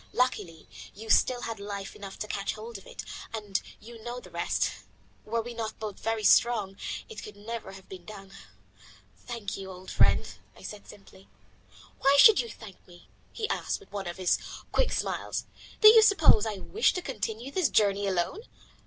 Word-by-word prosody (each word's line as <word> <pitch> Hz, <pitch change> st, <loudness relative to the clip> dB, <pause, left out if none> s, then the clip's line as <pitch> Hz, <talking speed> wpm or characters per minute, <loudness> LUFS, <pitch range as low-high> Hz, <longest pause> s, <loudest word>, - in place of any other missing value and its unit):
Luckily 205 Hz, -10 st, -1 dB, 0.3 s
you 220 Hz, +2 st, -4 dB
still 245 Hz, -1 st, +4 dB
had 225 Hz, -3 st, -4 dB
life 200 Hz, -1 st, -6 dB
enough 195 Hz, -1 st, -9 dB
to 210 Hz, -, -4 dB
catch 200 Hz, -1 st, -2 dB
hold 220 Hz, 0 st, -8 dB
of -, -, -17 dB
it, -, -, -8 dB, 0.3 s
and 205 Hz, -3 st, -2 dB, 0.2 s
you 230 Hz, +1 st, -12 dB
know 240 Hz, +1 st, -5 dB
the -, -, -14 dB
rest. -, -, 0 dB, 0.5 s
Were 230 Hz, +1 st, -1 dB
we 240 Hz, +1 st, -7 dB
not 225 Hz, -2 st, -4 dB
both 215 Hz, -3 st, -6 dB
very 225 Hz, -1 st, -1 dB
strong, 210 Hz, -3 st, +4 dB, 0.3 s
it 445 Hz, -, -8 dB
could 210 Hz, -, -10 dB
never 215 Hz, 0 st, -6 dB
have 195 Hz, -1 st, -13 dB
been 185 Hz, -2 st, -10 dB
done." 195 Hz, -2 st, -10 dB, 1.0 s
"Thank 215 Hz, -4 st, -4 dB
you, 195 Hz, -1 st, -7 dB
old 185 Hz, 0 st, -9 dB
fellow," -, -, +4 dB, 0.3 s
I -, -, -15 dB
said 210 Hz, -1 st, -8 dB
simply. 195 Hz, -1 st, -15 dB, 0.7 s
"Why 275 Hz, +1 st, +5 dB
should 435 Hz, +7 st, +9 dB
you 235 Hz, -, -1 dB
thank 210 Hz, -3 st, -11 dB
me?" 175 Hz, -1 st, -17 dB, 0.2 s
he 435 Hz, -2 st, -3 dB
asked -, -, -1 dB
with 405 Hz, -, -19 dB
one 195 Hz, -3 st, -4 dB
of 175 Hz, -, -5 dB
his 185 Hz, -1 st, +2 dB, 0.3 s
quick -, -, +2 dB
smiles. -, -, -2 dB, 0.4 s
"Do 430 Hz, -, +12 dB
you 445 Hz, 0 st, +9 dB
suppose 330 Hz, -, +6 dB
that 220 Hz, -, -1 dB
I 195 Hz, -, -7 dB
wished 445 Hz, +3 st, +2 dB
to 360 Hz, -, -3 dB
continue 225 Hz, +1 st, -4 dB
this 350 Hz, -4 st, +2 dB
journey 200 Hz, -1 st, +2 dB
alone? 185 Hz, -, -1 dB
215 Hz, 190 wpm, -29 LUFS, 195-240 Hz, 1.0 s, Do